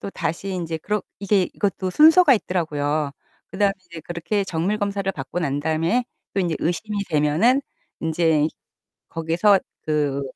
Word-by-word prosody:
또 200 - -5
다시 180 +2 -3
인제 165 -3 -3
그렇 210 +6 -1 0.2
이게 200 0 +2
이것도 190 -2 -1
순서가 315 - +7
있더라고요. 150 -7 -1 0.4
그 190 - -8
다음에 200 -1 +3
이제 170 -2 -11
그렇게 175 +5 -2
정밀 190 +4 -1
검사를 200 -1 -1
받고 140 +1 -5
난 145 -4 -1
다음에 165 +10 +1 0.3
또 195 - +1
인제 170 -4 0
의심이 205 +6 -2
되면은 165 - +3 0.4
인제 160 -2 +2 0.6
거기에서 165 +5 +3 0.2
그 145 -3 0
175 Hz, 325 characters per minute, -22 LUFS, 155-200 Hz, 0.6 s, 순서가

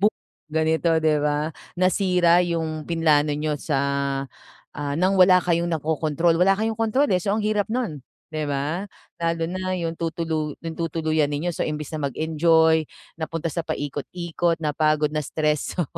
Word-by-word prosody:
bo 205 - +5 0.4
ganito, 160 +1 +1
di 155 -1 +3
ba? 150 +1 0 0.3
Nasira 180 -1 +3
yung 160 -3 -2
pinlano 155 -3 +3
niyo 150 0 -1
sa, 145 -4 0 1.0
ah, 145 -1 -3
nang 185 +3 +3
wala 185 0 +7
kayong 170 -1 +1
nakokontrol. 160 +1 +1
Wala 195 +2 +5
kayong 220 0 -1
kontrol 225 +6 +2
eh. 180 - +2
So, 200 - -1
ang 220 - -1
hirap 210 -1 0
nun, 220 - -2 0.3
di 155 0 -2
ba? 145 +6 -1 0.4
Lalo 165 0 0
na 185 +1 -3
yung 165 -1 -2
tutulu 160 -2 -3
tutuluyan 160 -2 -1
ninyo. 155 +5 -2
So, - - -2
imbes 150 -1 -4
na 150 -2 -1
mag-enjoy, 160 +2 +3 0.3
napunta 165 0 -4
sa 170 - -2
paikot-ikot, 165 +4 -2
napagod, 155 -1 +1
na-stress. 150 0 -1
So, 175 - +2
160 Hz, 150 wpm, -23 LUFS, 150-175 Hz, 1.0 s, wala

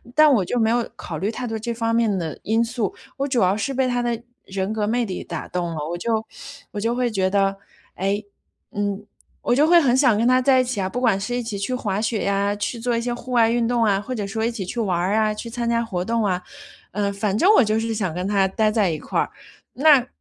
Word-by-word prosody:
但 305 -1 +7
我 205 -8 +3
就 245 - -1
没 220 0 +3
有 235 0 +1
考 160 - -6
虑 200 +8 -1
太 245 +1 -5
多 225 0 -3
这 235 +2 -3
方 230 0 -1
面 225 -3 +2
的 160 -2 -5
因 225 +2 +2
素， 230 -4 -2 0.2
我 275 +1 -1
主 260 -3 +1
要 190 +3 +3
是 270 +6 -2
被 260 0 +1
他 245 -1 0
的 235 -1 -1 0.2
人 190 +1 -3
格 215 -1 -1
魅 240 +1 +1
力 185 -3 -5
打 - - -6
动 175 -2 -3
了。 - - -5
我 175 - -3
就 225 +2 -1 0.5
我 210 - -4
就 230 +3 0
会 250 -1 +1
觉 190 -2 +1
得：” 195 -1 +2 0.4
哎， 200 +3 -1 0.5
嗯， 205 0 -2 0.4
我 245 - +1
就 290 - +4
会 345 +1 +7
很 255 -3 +3
想 255 -5 +4
跟 230 +2 +2
他 255 0 +5
在 260 0 +4
一 - - +1
起 250 -4 -3
啊， 185 - 0
不 250 +6 -4
管 195 -6 +3
是 245 +5 -3
一 245 - -1
起 215 -3 -4
去 230 +6 -2
滑 205 -5 -1
雪 220 -1 -1
呀， 200 +1 +1
去 220 +3 -3
做 235 0 0
一 - - -1
些 240 +1 -2
户 240 +1 -8
外 230 -2 +4
运 235 0 +1
动 240 -1 +2
啊， 200 -2 +3
或 255 +5 -5
者 205 -4 -3
说 220 +2 -2
一 235 - 0
起 225 -4 -5
去 235 +7 -5
玩 190 -6 0
儿 185 +4 0
啊， 215 -1 +2
去 230 +2 -7
参 235 0 -3
加 235 0 +1
活 185 -6 -3
动 230 -1 0
啊。 180 -2 0 0.5
“嗯， 200 0 -1
反 200 0 -1
正 370 - +5
我 - - +6
就 215 0 +1
是 225 0 -2
想 190 -6 -2
跟 180 +3 -3
他 195 -1 +3
呆 215 +3 +1
在 210 -4 +2
一 155 - -3
块 - - -2
儿。 - - 0 0.4
那 275 -3 +5
220 Hz, 290 characters per minute, -22 LUFS, 200-240 Hz, 0.5 s, 但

